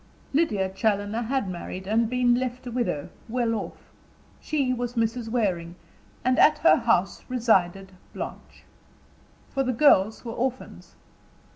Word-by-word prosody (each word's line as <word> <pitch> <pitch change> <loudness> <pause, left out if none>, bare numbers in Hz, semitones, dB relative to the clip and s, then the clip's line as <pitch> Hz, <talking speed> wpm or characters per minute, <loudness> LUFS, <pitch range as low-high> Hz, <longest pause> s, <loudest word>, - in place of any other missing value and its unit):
Lydia 220 - +1
Challoner 205 +2 -1
had 255 -1 -1
married, 185 +1 -6
and 220 +3 +1
been 250 -1 +3
left 250 0 -2
a 245 - -5
widow, 235 -12 -2 0.2
well 235 -1 0
off. 215 - -6 0.5
She 275 -5 0
was 245 0 -4
Mrs. 230 0 -1
Waring; 180 -8 -1 0.5
and 255 0 +2
at 305 - +6
her - - +7
house 225 -7 +1
resided 195 -6 +1 0.2
Blanche. - - -8 0.9
For 270 - -1
the 255 -1 0
girls 225 -5 +4
were 230 - -4
orphans. 255 +2 -4
230 Hz, 135 wpm, -25 LUFS, 200-250 Hz, 0.9 s, her